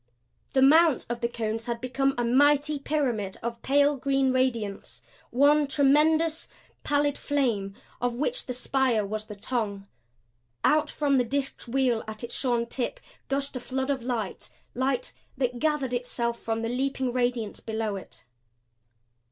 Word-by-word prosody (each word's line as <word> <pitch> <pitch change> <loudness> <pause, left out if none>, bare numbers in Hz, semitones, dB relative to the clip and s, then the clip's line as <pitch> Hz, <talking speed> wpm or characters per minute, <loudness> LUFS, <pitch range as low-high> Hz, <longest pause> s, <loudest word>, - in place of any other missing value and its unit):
The 265 - +4
mount 310 0 +5
of 240 0 -4
the 235 - +2
cones 225 -1 -3
had 235 -1 -2
become 270 +2 0
a 240 - 0
mighty 290 +4 +3
pyramid 250 -10 -1
of 235 0 -4
pale 285 +1 +3
green 270 0 +1
radiance 235 -6 -1 0.3
one 285 +3 +4
tremendous, 305 +4 +3 0.4
pallid 290 0 +1
flame, 230 -9 0 0.3
of 245 -1 0
which 480 - -1
the 250 - -2
spire 250 -3 +1
was 215 +1 -4
the 210 - -9
tongue. 205 -2 -3 0.8
Out 305 0 +3
from 280 -3 +1
the - - +3
disked 275 +1 -2
wheel 245 -2 +1
at 215 0 -7
its 235 - -5
shorn 240 -3 0
tip 260 - -3 0.3
gushed 275 0 -1
a - - -2
flood 265 +2 -2
of 270 -2 -2
light 240 -2 -3 0.2
light 260 0 -1 0.2
that 250 -2 -1
gathered 300 -4 0
itself 240 -1 -2
from 225 0 -2
the 230 - -1
leaping 260 0 -1
radiance 245 -3 -1
below 220 -2 -3
it. 195 - -9
255 Hz, 150 wpm, -27 LUFS, 235-280 Hz, 0.8 s, mount